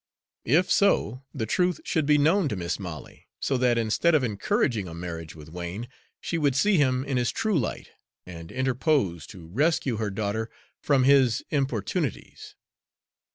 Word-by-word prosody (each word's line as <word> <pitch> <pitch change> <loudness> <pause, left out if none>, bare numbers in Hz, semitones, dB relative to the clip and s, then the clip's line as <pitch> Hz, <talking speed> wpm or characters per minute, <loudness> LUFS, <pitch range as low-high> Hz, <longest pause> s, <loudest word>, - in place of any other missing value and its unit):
If 160 +10 +3
so, 130 - +2
the 110 - -3
truth 180 - +1
should 155 -3 0
be 150 0 +5
known 160 +3 +3
to - - -2
Mis' 85 0 -3
Molly, 85 -8 -9
so 135 - 0
that 125 -1 +2
instead 115 +9 +2
of 145 - +3
encouraging 110 -1 0
a 80 - -8
marriage 85 -2 -7
with 75 -2 -12
Wain, 90 +7 -6 0.3
she 165 - -3
would 145 -4 +2
see 205 +7 +3
him 130 -3 +2
in 135 -2 -1
his 120 -1 +1
true 215 -3 -1
light, 115 - -4 0.4
and 85 -2 -10
interpose 130 - 0
to 90 -4 -11
rescue 135 - 0
her 110 -1 -1
daughter 110 +2 -2 0.3
from 140 -3 +2
his 130 -4 +4
importunities. 135 -8 -3
125 Hz, 160 wpm, -26 LUFS, 95-145 Hz, 0.4 s, be